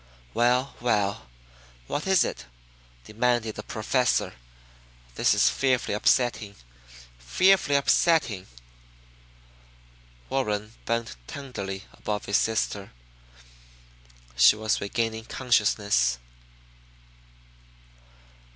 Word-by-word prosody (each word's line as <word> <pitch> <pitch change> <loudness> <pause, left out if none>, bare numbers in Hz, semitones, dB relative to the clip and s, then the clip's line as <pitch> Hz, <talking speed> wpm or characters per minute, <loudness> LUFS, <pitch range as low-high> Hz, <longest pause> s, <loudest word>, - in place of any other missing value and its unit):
"Well, 125 +3 +1
well, 105 - 0 0.6
what 145 - -4
is 190 -2 +4
it?" - - -5 0.6
demanded 115 - 0
the - - -7
Professor. 125 +3 0 0.8
"This - - +2
is - - +4
fearfully 130 -5 +1
upsetting, 120 -2 +1 0.6
fearfully 175 - +3
upsetting!" 140 - +2 1.8
Warren 105 -5 -2
bent 115 - -2
tenderly 100 -9 -6
above 105 -1 -4
his 100 - +2
sister. 105 -3 -1 1.4
She 60 +11 +6
was 110 -2 -1
regaining 110 +2 -2
consciousness. 105 - +1
110 Hz, 80 wpm, -26 LUFS, 100-125 Hz, 1.8 s, She